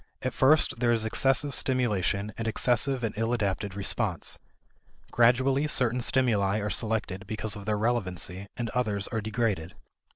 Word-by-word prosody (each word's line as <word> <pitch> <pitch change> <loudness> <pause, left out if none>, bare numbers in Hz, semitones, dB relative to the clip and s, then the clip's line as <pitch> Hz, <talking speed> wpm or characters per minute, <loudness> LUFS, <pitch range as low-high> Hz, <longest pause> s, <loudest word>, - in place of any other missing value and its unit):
At 130 - -1
first, 140 -2 +3
there 120 -1 +2
is 115 -1 +1
excessive 135 +5 +1
stimulation 105 -6 0
and 115 - -4
excessive 125 +3 +1
and 110 -2 -1
ill 115 +1 0
adapted 100 -3 -2
response. 100 -2 -2 0.7
Gradually 130 +4 +3
certain 125 -4 +2
stimuli 110 -6 +2
are 105 -1 -2
selected 105 -3 -2
because 110 0 -2
of 100 0 -9
their 105 -1 +1
relevancy, 100 -4 -1
and 115 -2 -3
others 105 -5 -1
are 115 -2 -2
degraded. 105 -6 -2
110 Hz, 150 wpm, -27 LUFS, 100-125 Hz, 0.7 s, first